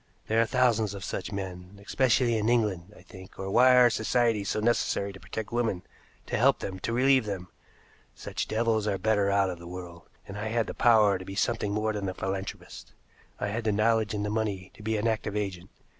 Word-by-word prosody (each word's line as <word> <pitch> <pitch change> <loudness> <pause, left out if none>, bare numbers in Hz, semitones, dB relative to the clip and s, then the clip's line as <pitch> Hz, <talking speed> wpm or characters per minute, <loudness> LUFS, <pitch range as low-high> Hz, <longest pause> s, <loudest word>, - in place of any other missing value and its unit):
"There 110 +1 +2
are 115 - +1
thousands 115 -5 +2
of 100 - -7
such - - -4
men, 95 -1 -7
especially 125 -1 +2
in 110 +1 0
England, 105 -6 0
I - - -16
think, 95 0 -14
or 95 0 -4
why 125 +4 +6
are 125 -1 +6
societies 110 -2 +1
so - - -1
necessary 105 -3 0
to 95 - -12
protect 110 +2 -6
women, 115 -6 -1 0.4
to - - -2
help - - +4
them, 95 -1 -6
to 115 - -3
relieve 130 0 +3
them? 95 -3 -5 0.7
Such - - -4
devils 110 -1 0
are 100 -2 0
better 105 0 +1
out 100 -1 +2
of 90 - -8
the 85 - -10
world, 90 -1 -9 0.2
and 100 +1 -7
I 110 - -3
had 115 0 0
the - - -6
power 105 -5 +4
to - - -7
be 95 +1 -8
something 105 -1 0
more 110 +1 0
than 100 -2 -3
a 95 - -6
philanthropist. 95 0 -6 0.5
I - - -2
had 115 +3 -3
the 110 - +1
knowledge 110 +1 +1
and 105 0 -2
the 105 - -2
money 105 -4 -2
to - - -15
be 110 +1 -1
an 105 +2 0
active 110 -2 -2
agent. 95 -4 -4
105 Hz, 220 wpm, -28 LUFS, 95-115 Hz, 0.7 s, why